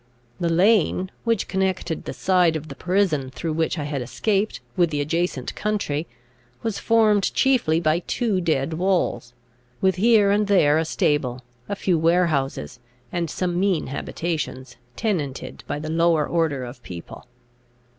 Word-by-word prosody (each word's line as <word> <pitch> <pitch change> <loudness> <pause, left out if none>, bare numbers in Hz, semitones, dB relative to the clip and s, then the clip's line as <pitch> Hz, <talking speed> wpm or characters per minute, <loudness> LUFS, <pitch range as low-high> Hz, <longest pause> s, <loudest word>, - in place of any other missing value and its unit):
The 170 - 0
lane, 185 +1 +3
which 230 -3 +1
connected 190 -4 -1
the - - -4
side 180 -3 +2
of 155 0 -5
the 140 - -7
prison 175 -7 0
through 160 +4 -4
which 160 +2 0
I 150 - -2
had 145 -2 -3
escaped 200 - -1 0.2
with 175 -3 +3
the 150 -2 -2
adjacent 150 -2 -1
country, 185 -8 -2 0.6
was 225 -3 -2
formed 215 -4 +3
chiefly 240 -12 +3
by 160 0 +2
two 215 -7 0
dead 160 -2 0
walls, 165 -9 0 0.5
with 190 -1 +2
here 210 -1 +5
and 205 0 +2
there 160 -7 +4
a 165 - 0
stable, 130 -5 0 0.3
a 200 - -1
few 180 -4 +1
warehouses, 155 - +1 0.3
and 170 -2 -2
some 175 +1 -1
mean 190 -5 +1
habitations, 140 -6 -4 0.2
tenanted 160 - -3
by - - -2
the 155 +1 -5
lower 165 -2 +3
order 160 -6 0
of 120 +3 -10
people. 90 +7 -10
170 Hz, 150 wpm, -23 LUFS, 145-190 Hz, 0.6 s, here